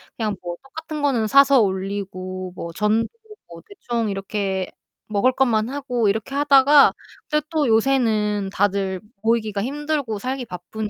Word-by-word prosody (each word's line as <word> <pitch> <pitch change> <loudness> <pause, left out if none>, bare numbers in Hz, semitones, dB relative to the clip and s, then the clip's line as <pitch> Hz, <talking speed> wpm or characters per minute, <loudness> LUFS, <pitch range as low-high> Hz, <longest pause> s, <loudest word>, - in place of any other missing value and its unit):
그냥 215 -3 -2
뭐 175 -1 -5
떡 270 - -22
같은 320 -2 -6
거는 245 -7 +1
사서 275 +1 +6
올리고 185 -2 -3
뭐 170 - -6
전도 215 +3 +1 0.2
그렇고 420 - -14
대충 235 - -3
이렇게 195 -1 -2 0.4
먹을 215 +4 +2
것만 240 -3 +1
하고 250 -5 -1
이렇게 220 +7 -2
하다가 285 0 +6 0.4
근데 300 0 0
또 310 -5 +1
요새는 220 -4 +1
다들 195 -2 0 0.2
모이기가 220 -3 0
힘들고 285 -5 -2
살기 255 +2 -3
바쁘니까 210 +3 -6
220 Hz, 315 characters per minute, -22 LUFS, 200-275 Hz, 0.4 s, 사서